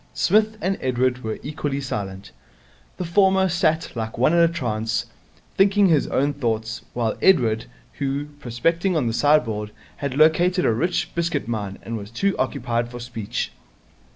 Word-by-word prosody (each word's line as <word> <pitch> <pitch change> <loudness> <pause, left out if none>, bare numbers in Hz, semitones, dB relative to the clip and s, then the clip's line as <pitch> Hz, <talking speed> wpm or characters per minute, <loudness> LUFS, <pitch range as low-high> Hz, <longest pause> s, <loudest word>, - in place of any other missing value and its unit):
Psmith 215 +3 +2
and 195 +2 -1
Edward 125 0 0
were 110 -1 -3
equally 145 -1 -3
silent. 100 -7 -5 0.7
The 180 - -3
former 190 +2 +3
sat 165 -3 +1
like 110 -1 -4
one 130 +7 +3
in 170 - +4
a 170 - +6
trance, 115 -9 -2 0.5
thinking 195 0 +4
his 155 -4 +3
own 145 +2 +1
thoughts, 115 -3 -2
while 115 -3 0
Edward, 115 -12 +3 0.3
who, 140 +1 -1
prospecting 165 +9 0
on 145 - +1
the 115 - 0
sideboard, 115 -5 +2 0.3
had 140 -2 -3
located 175 +4 +4
a - - +3
rich 175 +10 -1
biscuit 170 -7 -1
mine, 105 -4 -3 0.2
was 100 -2 -6
too 195 - 0
occupied 120 -1 -1
for 120 0 -8
speech. 115 -3 -4
135 Hz, 155 wpm, -23 LUFS, 115-170 Hz, 0.7 s, a